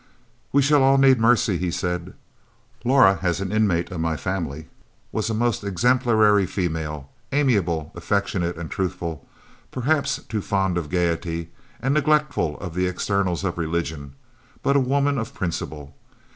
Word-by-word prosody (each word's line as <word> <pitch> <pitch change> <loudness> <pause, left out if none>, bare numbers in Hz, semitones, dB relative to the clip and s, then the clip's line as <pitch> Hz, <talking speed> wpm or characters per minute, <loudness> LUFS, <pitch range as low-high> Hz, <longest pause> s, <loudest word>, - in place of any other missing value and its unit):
"We 140 0 +4
shall 145 +1 +4
all 135 +1 +5
need 135 -2 +5
mercy," 115 -4 +3
he 90 0 -1
said. 90 +1 -3 0.7
"Laura 125 -6 +5
as 90 -2 0
an 95 -1 -3
inmate 100 -5 +1
of 90 - -5
my 80 -1 -1
family 80 -5 -4 0.4
was 110 0 -1
a 110 - -1
most 115 -2 0
exemplary 110 -1 +3
female, 80 -6 -3 0.2
amiable, 100 - +1
affectionate 85 -1 -1
and 85 -2 -7
truthful, 85 -4 -3 0.4
perhaps 140 +3 0
too 110 -3 -2
fond 95 -3 0
of 75 -4 -7
gaiety, 85 -1 -1 0.3
and 135 +2 0
neglectful 150 - +1
of 85 -4 -6
the 90 +1 0
externals 90 -1 -1
of 90 -2 -2
religion, 80 -4 -3 0.5
but 140 - +2
a - - +6
woman 140 +1 +1
of 115 - -5
principle. 75 -5 -5
95 Hz, 145 wpm, -23 LUFS, 85-120 Hz, 0.7 s, a